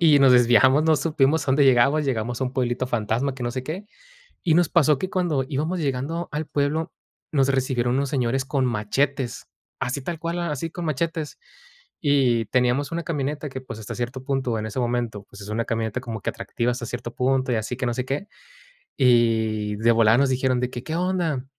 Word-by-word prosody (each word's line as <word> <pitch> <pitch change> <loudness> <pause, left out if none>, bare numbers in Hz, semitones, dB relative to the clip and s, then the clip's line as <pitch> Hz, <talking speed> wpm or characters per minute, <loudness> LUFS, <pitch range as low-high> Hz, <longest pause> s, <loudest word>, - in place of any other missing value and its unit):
y - - +5
nos 135 -2 +6
desviamos. 125 +4 +5
No 160 -1 +4
supimos 150 +1 +1
a 135 - 0
dónde 140 +2 +4
llegamos, 135 +4 +4
llegamos 120 -1 -2
a - - +3
un 130 0 -3
pueblito 125 0 -1
fantasma 120 +4 -1
que 125 - -6
no 120 - -1
sé 130 +1 -3
qué. 180 +9 -5 0.6
Y 165 - +3
nos 175 +1 +3
pasó 150 -4 +3
que 185 - -3
cuando 175 -9 0
íbamos 155 +5 -1
llegando 145 +4 -2
al 150 +1 -3
pueblo, 150 +3 -1 0.4
nos 135 -3 +3
recibieron 130 -2 +1
unos 140 -1 0
señores 130 0 0
con 135 -1 0
machetes, 125 +3 -1 0.3
así 130 +3 -2
tal 165 +4 -5
cual, 170 +1 -3
a 170 -2 -2
así 150 +3 -3
con 170 +1 -6
machetes. 160 +1 -2 0.6
Y 130 -6 +2
teníamos 130 +5 +1
una 170 - -2
camioneta 150 -1 -3
que, 130 0 -6
pues, 110 -4 -8
hasta 105 - -6
cierto 125 +2 -4
punto, 130 -4 -1
en 110 - -4
ese 110 +4 -4
momento, 120 -4 -2
pues, 100 - -12
es 100 - -9
una 115 +2 -1
camioneta 115 +1 -2
como 115 -4 -6
que - - -2
atractiva 120 +1 -2
hasta 120 -1 -4
cierto 120 0 -6
punto 130 0 +1
y - - +2
así 110 +2 -2
que 130 - -2
no 120 - 0
sé 125 - -2
qué. 140 +10 -3 0.7
Y 110 -4 +2
de 115 +2 +3
volada 115 0 +5
nos 140 0 +3
dijeron 130 -1 +1
de 125 0 -1
que: 120 - -6
“¿Qué 160 - -4
onda?”. 175 -7 -1
130 Hz, 210 wpm, -24 LUFS, 120-150 Hz, 0.7 s, nos